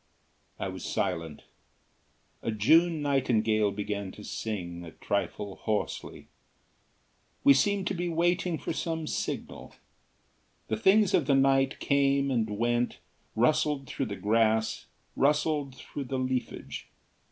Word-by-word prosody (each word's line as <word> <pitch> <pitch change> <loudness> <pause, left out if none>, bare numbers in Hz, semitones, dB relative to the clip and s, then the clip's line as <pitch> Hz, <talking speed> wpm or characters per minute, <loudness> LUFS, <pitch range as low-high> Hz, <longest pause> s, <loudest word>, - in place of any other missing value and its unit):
I - - -3
was - - -6
silent. 80 -2 -2 1.0
A - - -3
June 155 +9 +4
nightingale 110 -7 +2
began 100 -1 -4
to 105 - -11
sing, 90 -7 -5
a 85 - -8
trifle 100 -1 -3
hoarsely. 110 -2 -3 1.2
We 140 - +8
seemed 195 +8 +1
to - - 0
be 175 -1 -2
waiting 170 +1 +1
for - - -4
some 160 0 -2
signal. - - -4 0.9
The 110 - 0
things 195 - +4
of 145 - +3
the 140 - +4
night 135 0 +3
came 140 0 +2
and 115 -4 +1
went, 120 +3 0 0.4
rustled 135 +4 +2
through 135 -1 -3
the 100 - -4
grass, 110 +1 +1 0.3
rustled 145 -1 +1
through 140 +1 -7
the 130 +1 -3
leafage. 130 -1 -3
130 Hz, 125 wpm, -29 LUFS, 110-150 Hz, 1.2 s, We